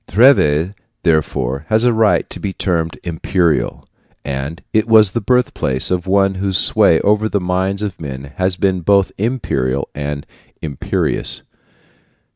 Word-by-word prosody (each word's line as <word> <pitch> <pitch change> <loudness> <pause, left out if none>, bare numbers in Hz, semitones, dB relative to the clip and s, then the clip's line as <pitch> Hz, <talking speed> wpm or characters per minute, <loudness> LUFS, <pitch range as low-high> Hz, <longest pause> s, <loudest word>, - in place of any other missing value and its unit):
Treves, 95 - +4 0.3
therefore, 75 -3 0
has 110 +1 +3
a 125 -1 +3
right 110 -1 +2
to - - -7
be 100 -2 -4
termed 80 -6 -2
imperial, 85 -1 -1 0.4
and 70 +4 -4
it 110 +1 +2
was 110 -3 +6
the 120 - -2
birthplace 105 - 0
of 90 0 -1
one 95 0 +3
whose 95 0 -1
sway - - +4
over 105 +1 +2
the 100 - 0
minds 95 +2 -1
of 100 -5 -5
men 65 -3 -6
has 95 0 +1
been 95 -1 0
both 100 +2 +3
imperial 70 - -1
and 75 0 -4 0.3
imperious. 75 -4 -2
95 Hz, 140 wpm, -17 LUFS, 75-105 Hz, 0.4 s, was